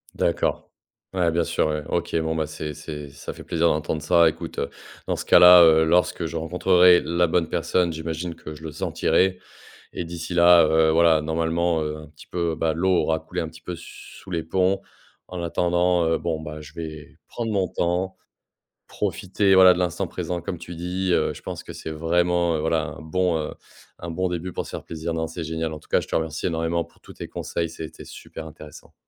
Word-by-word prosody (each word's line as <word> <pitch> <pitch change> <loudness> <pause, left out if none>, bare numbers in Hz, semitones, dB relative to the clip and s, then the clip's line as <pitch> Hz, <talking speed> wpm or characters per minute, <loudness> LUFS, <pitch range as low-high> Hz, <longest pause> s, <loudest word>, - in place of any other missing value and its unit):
D'accord. - - 0 0.4
Ouais, 90 -3 +2
bien 85 +1 +1
sûr, - - 0
ouais. 75 -1 -2
OK, 85 -1 -2
bon 80 0 -1
bah, 80 -1 0
c'est 75 0 -6
c'est, 75 -1 -8
ça 70 0 -8
fait - - -11
plaisir 85 0 +1
d'entendre 75 +1 -1
ça. 85 +2 +5
Écoute, - - -7
heu, - - -2 0.4
dans - - 0
ce - - -4
cas-là, 90 0 +9
heu, 80 -1 +6
lorsque 85 +1 +2
je 80 +1 -5
rencontrerai 90 +2 +4
la 85 +1 +1
bonne 80 0 +1
personne, 90 -2 +1
j'imagine 80 +1 -4
que 75 - -9
je 75 - -13
le 80 - -5
sentirai. 90 +4 +1 0.5
Et - - -3
d'ici 85 +1 -6
là, 85 -1 +7
heu, 80 0 +3
voilà, 80 -1 +4
normalement, 80 +1 0
heu, 75 0 -3
un 75 0 -11
petit 75 0 -17
peu, 85 -2 -1
bah, 80 0 0
l'eau 90 +4 0
aura 80 0 0
coulé 80 +3 -6
un 80 - -3
petit 80 0 -15
peu, 90 - -6
sous 90 +2 -12
les 85 -2 -1
ponts. 95 +3 +1 0.5
En 90 -1 -5
attendant, 85 +1 +1
heu, 80 0 +2
bon 80 -2 -3
bah, 75 -1 -7
je 75 -1 -13
vais 80 -3 -8
prendre 115 -2 -4
mon 95 -2 +1
temps, 90 +2 -1 0.7
profiter 95 +1 0
voilà 95 -1 +8
de 90 - -4
l'instant 90 -2 -1
présent 90 -1 -4
comme 85 +1 -5
tu 85 +1 -9
dis. 90 +2 -2
Heu, - - +1
je - - -12
pense - - -6
que - - -9
c'est - - -7
vraiment, 85 +1 +1
heu, - - -3
voilà 80 +1 +1
un - - -11
bon, 90 +1 0
heu, 75 - -4 0.5
un 85 - -6
bon 90 +3 -1
début 90 +1 -4
pour - - -3
se - - -10
faire - - -6
plaisir, 80 +1 -5
non, 80 0 -2
c'est 80 +1 -6
génial. 80 0 -3
En-tout-cas, 75 0 -1
je - - -9
te - - -3
remercie 80 -1 -1
énormément 85 0 -1
pour - - -26
tous - - -13
tes - - -8
conseils, 85 -1 -3
c'était 80 -1 -9
super 80 - -10
intéressant. 75 -1 -13
85 Hz, 215 wpm, -24 LUFS, 80-90 Hz, 0.7 s, cas-là